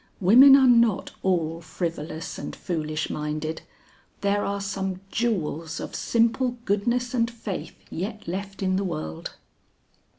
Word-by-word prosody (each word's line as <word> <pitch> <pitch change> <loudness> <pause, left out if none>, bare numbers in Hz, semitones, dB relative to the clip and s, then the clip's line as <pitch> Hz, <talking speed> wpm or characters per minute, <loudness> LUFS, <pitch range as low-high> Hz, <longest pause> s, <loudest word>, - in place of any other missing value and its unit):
Women 250 +9 +9
are 270 -1 +6
not 235 -5 +4
all 165 -3 0
frivolous 165 -1 -4
and - - -6
foolish 155 -3 -3
minded; 155 +1 -3 0.6
there 200 0 +1
are 200 0 -2
some 195 -1 -3
jewels 165 -8 -1
of - - -6
simple 240 +2 +1
goodness 240 +5 0
and 230 -2 +2
faith 225 -5 -6 0.2
yet 210 +5 -5
left 195 +2 -4
in 185 0 +1
the 200 - 0
world." 80 - -5
195 Hz, 130 wpm, -25 LUFS, 165-230 Hz, 0.6 s, Women